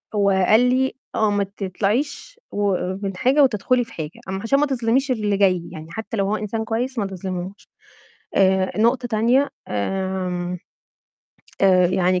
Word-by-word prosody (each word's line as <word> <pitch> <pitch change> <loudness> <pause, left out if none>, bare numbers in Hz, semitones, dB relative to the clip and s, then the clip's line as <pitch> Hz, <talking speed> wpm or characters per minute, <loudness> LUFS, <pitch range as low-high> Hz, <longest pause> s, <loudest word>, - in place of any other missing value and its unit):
هو 200 -1 +3
قال 190 +3 +4
لي 260 +1 +1 0.2
آه 215 -1 +2
ما 205 0 +1
تطلعيش 205 - -3
و 205 -2 +1 0.3
من 195 -2 -4
حاجة 265 +5 +4
وتدخلي 250 0 +2
في 230 - -14
حاجة، 155 0 -6
أم 190 0 -3
عشان 250 +6 +2
ما 295 - +3
تظلميش 260 0 0
اللي 210 -4 0
جاي، 185 -3 +3
يعني 160 +1 -9
حتى 220 +4 -5
لو 195 - +1
هو 210 - +1
إنسان 215 +1 -3
كويس، 240 +4 -2
ما 205 - 0
تظلميهوش، 185 0 -6 0.7
آآ، 190 -1 +3
نقطة 240 +3 +2
تانية 240 +5 +2 0.2
آمم، 180 - -2 1.0
آآ، 185 -2 +5
يعني 185 0 +1
205 Hz, 155 wpm, -22 LUFS, 190-240 Hz, 1.0 s, آآ